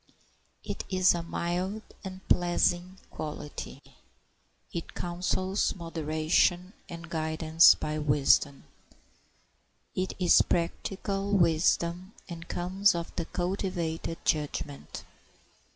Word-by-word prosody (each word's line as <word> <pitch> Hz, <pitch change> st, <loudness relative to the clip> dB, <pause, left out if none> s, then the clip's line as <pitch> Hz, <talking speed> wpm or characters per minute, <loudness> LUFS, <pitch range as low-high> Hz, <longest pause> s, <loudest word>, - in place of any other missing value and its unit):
It -, -, -5 dB
is 185 Hz, -1 st, +4 dB
a 170 Hz, -, -2 dB
mild 180 Hz, +5 st, -3 dB, 0.2 s
and 190 Hz, -1 st, -9 dB
pleasing 175 Hz, +1 st, +1 dB
quality. 150 Hz, -1 st, -7 dB, 0.9 s
It 170 Hz, -, -6 dB
counsels 185 Hz, +3 st, -1 dB
moderation 165 Hz, +2 st, 0 dB, 0.2 s
and 170 Hz, -1 st, -8 dB
guidance 160 Hz, 0 st, +4 dB
by 155 Hz, 0 st, -3 dB
wisdom. 145 Hz, -1 st, +2 dB, 1.3 s
It 185 Hz, 0 st, -2 dB
is 180 Hz, -2 st, +5 dB
practical 195 Hz, +3 st, -2 dB
wisdom, 170 Hz, +1 st, +2 dB
and 170 Hz, -1 st, -8 dB
comes 190 Hz, +3 st, +2 dB
of 170 Hz, -1 st, -5 dB
the 170 Hz, -, -2 dB
cultivated 175 Hz, -3 st, -3 dB
judgment. 145 Hz, -2 st, -2 dB
170 Hz, 90 wpm, -29 LUFS, 160-185 Hz, 1.3 s, is